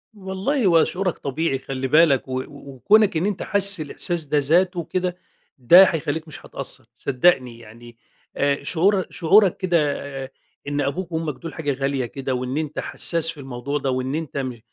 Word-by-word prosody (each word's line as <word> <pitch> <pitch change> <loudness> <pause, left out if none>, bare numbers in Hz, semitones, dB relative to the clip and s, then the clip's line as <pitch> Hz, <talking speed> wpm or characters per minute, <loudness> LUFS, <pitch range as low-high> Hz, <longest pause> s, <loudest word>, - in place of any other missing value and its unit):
والله، 200 +7 -2
هو 170 -3 +5
شعورك 185 -1 -2
طبيعي 140 0 -2
خلّي 130 0 -4
بالك، 150 -2 +4
و 130 0 -3
وكونك 145 - +1
إن 165 - 0
أنت 205 -2 -2
حاسس 200 -3 +2
الإحساس 160 +2 -3
ده 150 +1 0
ذاته 175 +5 +2
كده 180 +1 -3 0.4
ده 170 +9 +8
هيخلّيك 160 -2 -1
مش 155 - -10
هتقصّر - - -7
صدّقني 125 -4 +1
يعني 115 +1 -14 0.4
آآ، 140 0 0
شعور 190 +3 +2
شعورك 190 +2 +3
كده 180 -3 +1 0.5
آآ، 130 - -10 0.4
إن 145 0 -1
أبوك 170 +6 -3
وأمك 160 -2 -2
دول 165 - -8
حاجة 145 -4 -2
غالية 135 -1 -2
كده، 135 +2 -4
وإن 125 +2 -3
أنت 155 -1 -3
حسّاس 165 -1 +1
في 160 - -12
الموضوع 135 +1 -4
ده، 135 -2 -2
وإن 130 +2 -2
أنت 155 -3 -5
م 130 -3 -4
155 Hz, 170 wpm, -22 LUFS, 135-180 Hz, 0.5 s, ده